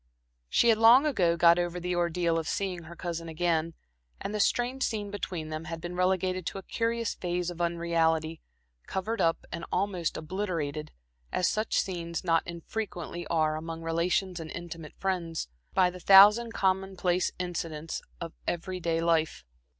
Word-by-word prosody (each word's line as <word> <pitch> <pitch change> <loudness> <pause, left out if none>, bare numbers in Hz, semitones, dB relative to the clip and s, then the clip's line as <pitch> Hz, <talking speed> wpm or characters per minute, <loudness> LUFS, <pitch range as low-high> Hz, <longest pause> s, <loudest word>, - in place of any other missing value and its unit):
She 235 - +4
had 220 -1 +4
long 235 +6 +8
ago 175 - +2
got 170 0 +6
over 175 0 -2
the 180 +1 -2
ordeal 170 -1 +1
of 160 - -5
seeing 185 -4 -2
her 170 +1 -10
cousin 170 -1 -5
again, 165 0 0 0.4
and 205 - -4
the 210 - -2
strange 245 +5 +1
scene 210 -5 -1
between 180 -6 -4
them 155 +1 -5
had 165 0 -5
been 175 +1 -6
relegated 185 0 +1
to - - -3
a 195 - -7
curious 230 +1 -1
phase 180 0 -2
of 175 0 -7
unreality, 165 -2 0 0.5
covered 220 +4 -2
up 165 0 +1
and 170 0 -5
almost 185 -3 -1
obliterated, 160 -4 -3 0.4
as 180 - +1
such 215 +1 +1
scenes 170 -3 -3
not 165 -1 +3
infrequently 175 -1 -5
are 155 -2 +1
among 165 +1 -6
relations 175 +2 0
and 160 -1 -7
intimate 165 -2 -8
friends, 175 - -2 0.3
by 180 -1 +4
the 180 - -10
thousand 205 +6 +7
commonplace 190 -3 0
incidents 165 -3 -4 0.2
of 165 -1 -6
every 185 +2 -2
day 165 -1 0
life. 165 - +1
175 Hz, 160 wpm, -29 LUFS, 165-190 Hz, 0.5 s, long